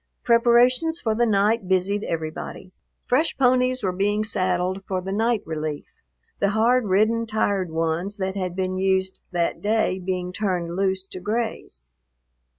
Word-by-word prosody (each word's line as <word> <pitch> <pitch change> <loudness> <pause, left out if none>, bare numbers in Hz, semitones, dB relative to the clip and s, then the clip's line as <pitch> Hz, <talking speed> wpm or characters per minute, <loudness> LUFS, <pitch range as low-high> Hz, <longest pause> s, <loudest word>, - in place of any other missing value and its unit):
Preparations 245 +7 +4
for 220 -7 0
the 240 +2 +2
night 210 0 +2
busied 190 +2 +1
everybody. 160 +2 -5 0.3
Fresh 295 +6 +1
ponies 255 -1 +2
were 190 - +1
being 205 +3 0
saddled 185 -2 -1
for 190 -1 -2
the 190 +1 -5
night 225 +1 +1
relief, 155 - -5 0.4
the 200 - +2
hard 230 +3 +2
ridden, 220 +4 +2
tired 200 -4 0
ones 165 +5 -2
that 190 -1 -2
had 185 -3 -3
been 185 0 -2
used 190 0 0
that 175 -2 -1
day 210 -3 +1
being 180 -1 -3
turned 180 -4 -2
loose 190 0 0
to 185 - -8
graze. 210 - -3
195 Hz, 150 wpm, -23 LUFS, 185-225 Hz, 0.4 s, Preparations